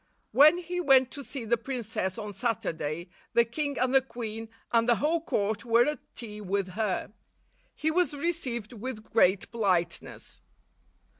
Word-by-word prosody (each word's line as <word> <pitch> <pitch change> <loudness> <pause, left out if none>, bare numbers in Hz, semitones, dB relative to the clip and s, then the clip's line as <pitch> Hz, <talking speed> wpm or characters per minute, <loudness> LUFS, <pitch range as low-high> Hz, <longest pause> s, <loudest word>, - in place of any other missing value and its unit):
When 305 +5 +7
he 355 0 -3
went 265 -5 +5
to 285 - -7
see 260 -3 -5
the 235 +1 +1
princess 225 -7 -3
on 210 -2 -5
Saturday, 175 -7 -2 0.2
the 235 0 +5
king 285 +4 -3
and 255 +1 +1
the 270 - +6
queen 225 -3 -6 0.2
and 230 0 +3
the 240 - +6
whole 320 +6 +1
court 210 -8 -1
were 235 0 +4
at 300 0 -1 0.2
tea 210 -3 -7
with 195 -1 -1
her. 205 0 -2 0.6
He 315 - 0
was 345 -2 +1
received 265 -8 -2
with 225 -1 -6
great 200 -4 +2
politeness. 185 -7 -1
235 Hz, 155 wpm, -28 LUFS, 210-275 Hz, 0.6 s, When